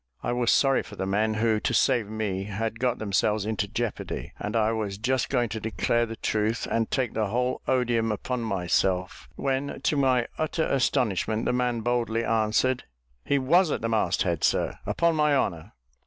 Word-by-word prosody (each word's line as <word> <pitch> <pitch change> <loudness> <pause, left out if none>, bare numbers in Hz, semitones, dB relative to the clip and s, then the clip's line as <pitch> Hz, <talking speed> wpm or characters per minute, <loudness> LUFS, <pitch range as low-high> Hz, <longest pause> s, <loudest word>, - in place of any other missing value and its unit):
I - - -1
was 120 -1 +2
sorry 135 -1 +4
for 105 - -11
the 95 - -3
men, 105 +3 +1
who, 110 0 +2
to - - -1
save 120 -6 +3
me, 105 -3 -2
had 110 +2 -3
got 125 -1 +1
themselves 105 0 0
into 105 -2 -1
jeopardy; 110 - -4
and 105 +2 -4
I 110 -1 +3
was 105 -3 -3
just 125 +4 0
going 120 -3 +1
to 110 +2 -4
declare 110 +2 0
the 115 - -6
truth, 110 +1 -1
and 115 -1 +1
take 130 -4 -1
the 110 -1 0
whole 125 +4 -1
odium 120 -3 +1
upon 125 +4 -3
myself, 95 -2 -1
when, 135 +1 -2
to 150 - +1
my 130 -3 +3
utter 155 +1 0
astonishment, 115 -5 0
the - - +1
man 125 -2 0
boldly 115 -1 0
answered, 115 +3 +1 0.4
"He 140 - +1
was 170 +7 +3
at - - -2
the 115 - -1
mast 105 -5 +1
head, 85 -5 -1
sir, - - +1
upon 170 -1 +2
my 150 -2 +3
honour." 85 - -2
115 Hz, 185 wpm, -26 LUFS, 105-125 Hz, 0.4 s, sorry